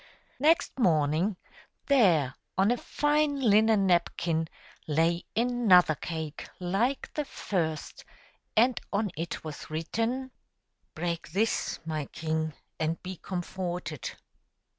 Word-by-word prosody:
Next 310 -1 +3
morning 165 - +2 0.5
there, 175 - +4 0.2
on 195 +4 +4
a 245 - +2
fine 295 +2 +1
linen 220 -3 +4
napkin, 170 -2 +1 0.4
lay 165 +3 +2
another 225 -8 +5
cake 160 -1 -5
like 200 +9 0
the 300 - -1
first, 165 - -3 0.5
and 245 +2 +4
on 205 -1 0
it 165 +2 -4
was 155 -2 -7
written: 230 +12 -2 0.3
" - - -48
Break 170 -1 -3
this, 220 +4 +1
my 155 -2 -2
king, 160 +1 -2 0.3
and 160 +1 0
be 185 0 -6
comforted." 175 - -4
180 Hz, 110 wpm, -29 LUFS, 160-225 Hz, 0.5 s, another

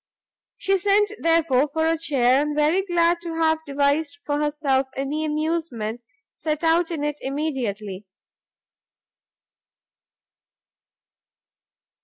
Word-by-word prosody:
She 390 0 +1
sent 410 +2 +3
therefore, 320 -4 +2
for 320 +1 0
a 325 - +2
chair, 275 -5 +2
and 295 0 -2 0.3
glad 340 -1 +2
to 335 -1 -5
have 320 -1 +2
devised 285 +1 0
for 290 0 -1
herself 290 -3 0
any 280 +3 -2
amusement, 305 -8 -2 0.3
set 305 0 -3
out 330 +1 +3
in 320 -4 -3
it 295 0 -2
immediately. 225 -9 -3
300 Hz, 100 wpm, -23 LUFS, 275-330 Hz, 0.3 s, sent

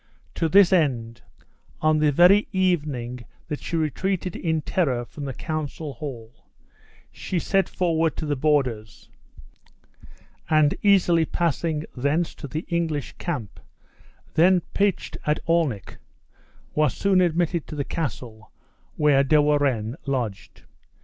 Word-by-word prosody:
To 165 - -1
this 190 +1 +6
end, 120 -9 0 0.6
on 155 0 +2
the 150 -1 +3
very 180 +7 +5
evening 145 - -1 0.3
that 150 - -4
she - - -4
retreated 180 +4 -2
in 160 -2 -1
terror 130 -10 0
from 145 +4 -8
the 135 - -4
council 155 -1 -4
hall, 120 -7 -9 0.6
she 185 - -4
set 195 +3 +1
forward 165 -3 0
to 155 - -3
the 145 -1 -1
borders; 130 -7 -1 1.4
and, 155 -2 +4
easily 180 -5 +4
passing 160 -1 -1
thence 145 +6 0
to 145 - -8
the 155 +5 -5
English 160 -6 -2
camp 140 - -5 0.7
(then 180 +2 +4
pitched 200 -2 0
at 150 - +2
Alnwick), 160 - 0 0.8
was 150 0 +1
soon 195 -2 +3
admitted 170 -1 0
to - - -7
the 145 - -1
castle, 120 -8 -5 0.5
where 145 -2 +4
De 150 +3 +4
Warenne 140 -5 +1
lodged. 120 -7 -4
155 Hz, 125 wpm, -24 LUFS, 135-170 Hz, 1.4 s, this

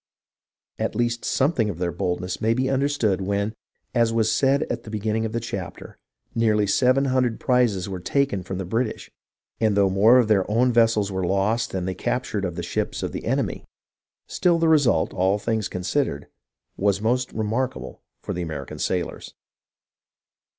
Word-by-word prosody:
At - - -2
least 120 0 0
something 130 -6 +1
of 85 - -5
their 85 0 -1
boldness 90 +1 -3
may 115 +1 +2
be 130 +1 0
understood 135 -8 +1
when, 100 +2 -1 0.4
as 115 -2 +3
was 110 -1 +2
said 140 +2 +2
at - - -4
the - - -11
beginning 110 +1 -1
of - - -8
this 115 0 -3
chapter, - - -7 0.3
nearly 110 -2 +2
seven 130 +6 +3
hundred 130 -3 +1
prizes 120 -8 +1
were 95 -2 -5
taken 135 +1 0
from 95 +1 -5
the 95 - -4
British; 110 +5 -2 0.5
and 110 -3 +2
though 100 -1 +4
more 110 +6 +6
of 120 -3 +4
their 100 -3 +2
own 120 +3 +2
vessels 115 -4 +3
were 95 -1 -2
lost 100 +6 +1
than 95 -2 -3
they 95 - -2
captured 105 0 -2
of 90 -2 -4
the 85 - -4
ships 85 - -3
of - - -2
the - - -6
enemy, - - -1 0.6
still 175 -2 +2
the 165 0 +2
result, 145 - +3
all 95 +2 +2
things 110 0 -1
considered, 90 - -2 0.5
was 100 0 +1
most 125 +4 0
remarkable 115 +4 -3 0.2
for - - -3
the 90 - -3
American 80 -3 -6
sailors. 90 -2 -3
110 Hz, 170 wpm, -24 LUFS, 95-125 Hz, 0.6 s, more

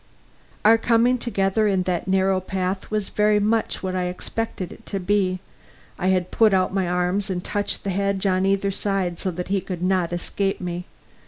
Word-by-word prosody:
Our 225 +1 +7
coming 240 +2 +3
together 215 -2 +1
in 190 -2 +2
that 180 0 -2
narrow 190 0 +2
path 185 +1 -3
was 215 -2 -2
very 210 0 +3
much 215 +1 0
what 185 0 -2
I 180 -1 0
expected 185 +1 -4
it - - -13
to 195 - -3
be. 185 -1 +1 0.6
I 185 - 0
had 185 -1 +1
put 215 -4 +4
out 185 0 +1
my 190 -3 0
arms 180 +3 0
and 180 -1 -2
touched 205 0 -1
the 200 - -1
hedge 200 +1 0
on 185 -1 +2
either 195 0 +1
side, 190 -3 -1
so 190 - -1
that 180 +1 -5
he 195 -1 +1
could 180 -2 -5
not 185 -2 +1
escape 195 +3 -2
me. 175 -1 -4
190 Hz, 190 wpm, -23 LUFS, 185-205 Hz, 0.6 s, Our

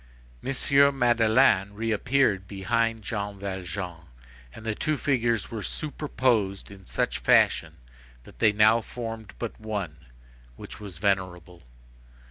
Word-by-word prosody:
M. 140 +1 +3
Madeleine 115 -4 +3
reappeared 115 -2 +1
behind 115 +3 -1
Jean 100 -1 -4
Valjean, 95 -3 -6 0.5
and 110 - -12
the 110 - 0
two 155 +7 -1
figures 120 -6 0
were 110 -2 -4
superposed 120 -10 -1
in 95 -2 -14
such - - -1
fashion - - +3 0.5
that - - -17
they 110 - +5
now 110 +2 +4
formed 115 -2 -7
but - - -6
one, 100 -8 -4 0.6
which - - -10
was 100 -5 -8
venerable. 90 -3 -2
110 Hz, 115 wpm, -26 LUFS, 95-115 Hz, 0.6 s, they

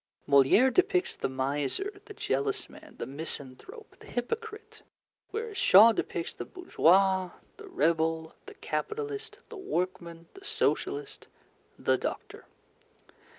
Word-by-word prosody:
Molière 140 - +5
depicts 370 -1 +2
the - - -2
miser, 145 - -2
the 415 -1 -11
jealous 135 - -1
man, - - -15
the - - -4
misanthrope, 145 - -6
the - - -15
hypocrite; 440 - -5 0.5
whereas 440 -3 -4
Shaw 215 - +8
depicts 170 -5 -3
the - - -6
bourgeois, 190 - +2 0.3
the 420 - -11
rebel, 165 - 0
the 415 - -10
capitalist, 430 +1 -4
the 455 - -9
workman, 170 - -4
the 390 - -14
Socialist, 425 +1 -2 0.5
the - - +1
doctor. 430 0 -6
250 Hz, 115 wpm, -29 LUFS, -, 0.5 s, Shaw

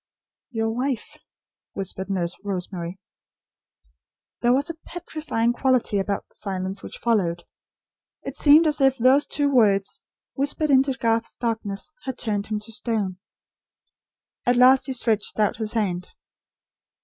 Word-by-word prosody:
"YOUR 225 -2 -1
WIFE," 250 0 -3 0.5
whispered 190 0 -5
Nurse 175 -3 -1
Rosemary. 180 -2 -4 1.4
There 240 - +3
was 275 +3 +2
a 330 - -14
petrifying 310 -9 -2
quality 250 -5 +2
about 200 +1 -2
the - - -28
silence 190 -1 -4
which - - -8
followed. 185 -7 0 0.8
It - - -6
seemed 300 +3 +6
as 300 -2 +2
if 270 -1 +4
those 260 +4 +4
two 285 -1 +1
words, 200 -6 +3 0.3
whispered 285 +2 0
into 270 0 +4
Garth's 230 -2 -1
darkness, 225 +1 -3
had 260 -2 -4
turned 205 -2 -1
him 215 -1 -2
to 220 +2 -8
stone. 215 -5 -2 1.2
At 245 - +3
last 255 +2 +6
he 265 - -1
stretched 225 -4 0
out 210 -2 +2
his 215 -1 -2
hand. 185 -6 -1
225 Hz, 135 wpm, -24 LUFS, 200-265 Hz, 1.4 s, seemed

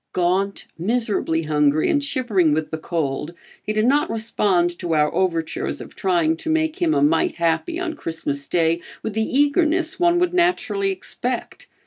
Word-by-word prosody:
Gaunt, 185 +3 0
miserably 205 -5 0
hungry 150 0 +2
and 290 -2 +1
shivering 215 - +1
with 155 0 -3
the 160 - -3
cold, 155 0 -3 0.3
he - - -3
did 215 +1 +1
not 285 +4 +2
respond 205 -6 +1
to 170 -3 -1
our 150 0 +2
overtures 165 -4 -1
of - - -10
trying 170 -4 +1
to 320 - -6
make 315 0 0
him 160 -3 +2
a 140 - +2
mite 160 +2 +2
happy 175 - 0
on 350 -3 -2
Christmas 150 - -4
day, 165 -1 +1 0.2
with 220 - -3
the 220 - 0
eagerness 310 +8 +2
one 345 0 +4
would 355 0 +1
naturally 360 +3 +1
expect. 385 - -4
190 Hz, 165 wpm, -22 LUFS, -, 0.3 s, one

